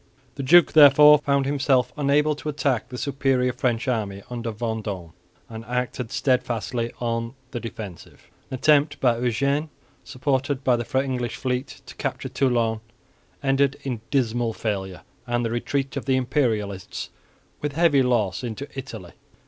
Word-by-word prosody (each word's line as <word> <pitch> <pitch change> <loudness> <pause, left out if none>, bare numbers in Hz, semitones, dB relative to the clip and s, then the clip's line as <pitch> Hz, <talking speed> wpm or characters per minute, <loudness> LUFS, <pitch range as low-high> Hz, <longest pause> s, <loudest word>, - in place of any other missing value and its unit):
The - - -6
duke 170 +6 +6
therefore 150 0 +8
found 140 -2 +1
himself 135 -3 +1
unable 150 +1 +2
to 150 - -5
attack 140 -5 -1
the 125 - -7
superior 135 -2 0
French 120 -1 -1
army 105 -5 -2
under 120 -1 -3
Vendôme, 105 -6 -4 0.3
and 110 0 -8
acted 125 0 -3
steadfastly 125 -2 -1
on 115 +1 -2 0.2
the 120 - -4
defensive. 110 -7 -9 0.2
An - - -4
attempt 145 +2 +3
by 120 -3 +2
Eugene, 140 +6 0 0.3
supported 135 0 -1
by 125 -2 +4
the 120 +3 -1
English 125 -3 -3
fleet, 130 0 -4
to - - -11
capture - - -3
Toulon 120 -4 +1 0.6
ended 135 0 +2
in 125 -5 -4
dismal 120 -4 0
failure 95 -5 -4 0.2
and 120 0 0
the 115 - -2
retreat 135 +4 -2
of 140 - -4
the 130 -1 +2
Imperialists 115 -7 -1 0.5
with 145 -1 -2
heavy 155 -3 +4
loss 115 -6 0
into 120 +4 -5
Italy. 110 -9 -8
125 Hz, 145 wpm, -24 LUFS, 115-140 Hz, 0.6 s, therefore